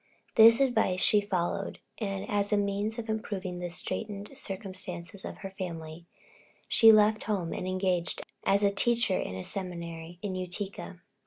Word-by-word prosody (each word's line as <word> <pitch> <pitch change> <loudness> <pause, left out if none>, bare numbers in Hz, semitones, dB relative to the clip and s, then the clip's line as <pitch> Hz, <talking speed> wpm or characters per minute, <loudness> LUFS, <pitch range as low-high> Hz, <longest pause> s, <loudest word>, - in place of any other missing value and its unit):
This 230 +2 +8
advice 220 -9 +2
she 210 +2 +5
followed, 195 -1 -2 0.2
and 195 -3 -3
as 205 0 0
a 210 - +4
means 205 +2 -1
of 235 -1 -5
improving 200 -4 -3
the 175 0 -4
straitened 205 +6 -4
circumstances 190 -5 -6
of - - -6
her 195 - -5
family, 170 -3 -7 0.6
she 225 -1 +7
left 215 0 +4
home 190 -6 -1
and 185 - -4
engaged 185 -2 -1 0.2
as 200 +1 +3
a 200 - +4
teacher 230 -1 +2
in 90 - -4
a 95 - -5
seminary 170 - -4
in 200 -2 -2
Utica. 185 0 -5
195 Hz, 155 wpm, -29 LUFS, 180-210 Hz, 0.6 s, This